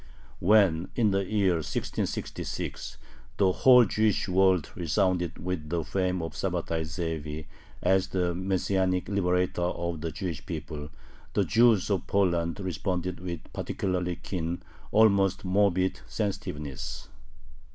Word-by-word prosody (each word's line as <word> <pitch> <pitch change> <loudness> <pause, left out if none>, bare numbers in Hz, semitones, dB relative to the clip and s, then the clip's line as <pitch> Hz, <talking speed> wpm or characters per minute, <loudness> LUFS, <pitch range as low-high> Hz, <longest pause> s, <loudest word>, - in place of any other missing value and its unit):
When, 95 -4 +4
in 110 -4 +3
the 95 0 +1
year 95 -4 +2
1666, 80 0 -4 0.4
the 95 -2 +4
whole 125 +4 +7
Jewish 110 0 +1
world 95 -3 +3
resounded 90 0 0
with 85 -4 -4
the 85 0 -1
fame 90 0 -1
of 80 - -5
Sabbatai 85 -3 -2
Zevi 80 -2 -4 0.4
as 95 0 +3
the 90 -2 0
Messianic 95 0 0
liberator 90 -2 +1
of 85 -2 -2
the 80 0 -3
Jewish 80 -1 -4
people, 75 -2 -5 0.4
the - - +2
Jews 115 -4 +4
of 95 -4 0
Poland 85 -4 +1
responded 90 0 -2
with 85 -3 -5
particularly 90 -2 -2
keen, 85 -1 -4 0.3
almost 100 -4 +4
morbid 95 -1 +2
sensitiveness. 70 - -4
90 Hz, 120 wpm, -28 LUFS, 85-95 Hz, 0.4 s, whole